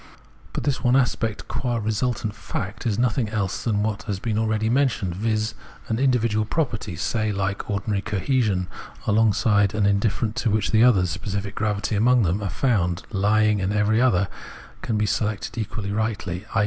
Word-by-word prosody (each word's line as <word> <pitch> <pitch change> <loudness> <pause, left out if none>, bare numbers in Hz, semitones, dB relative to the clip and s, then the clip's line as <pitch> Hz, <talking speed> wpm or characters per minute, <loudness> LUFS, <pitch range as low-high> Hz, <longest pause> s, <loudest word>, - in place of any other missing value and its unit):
But - - -4
this 140 -2 -1
one 125 +1 +4
aspect, 120 -5 0
qua 120 -2 -2
resultant 110 0 -1
fact, 105 +1 -5
is 105 - 0
nothing 120 -1 +1
else 100 -3 -2
than 105 -3 +1
what 110 0 -2
has 100 - -1
been 110 +1 -2
already 110 0 0
mentioned, 115 -8 +1
viz. 110 +2 -1 0.4
an 110 0 0
individual 115 -5 +2
property, 115 - -2
say, 110 +5 -1
like 100 0 -2
ordinary 100 0 -1
cohesion, 105 -2 0 0.4
alongside 105 -1 +3
and 105 -2 +2
indifferent 105 +2 +1
to 115 - +1
which 110 0 +1
the 110 +1 +5
others, 95 -8 +4
specific 100 0 -4
gravity 105 0 -1
among 120 +3 +4
them, 95 +3 0
are 100 - -2
found 90 -10 0
lying, 105 0 +2
and 95 +2 0
every 105 +2 +2
other 100 -7 +3 0.5
can 110 - -1
be 105 - +1
selected 105 0 -2
equally 105 -2 -4
rightly, 105 -3 -2
i. - - +4
110 Hz, 170 wpm, -24 LUFS, 100-115 Hz, 0.5 s, the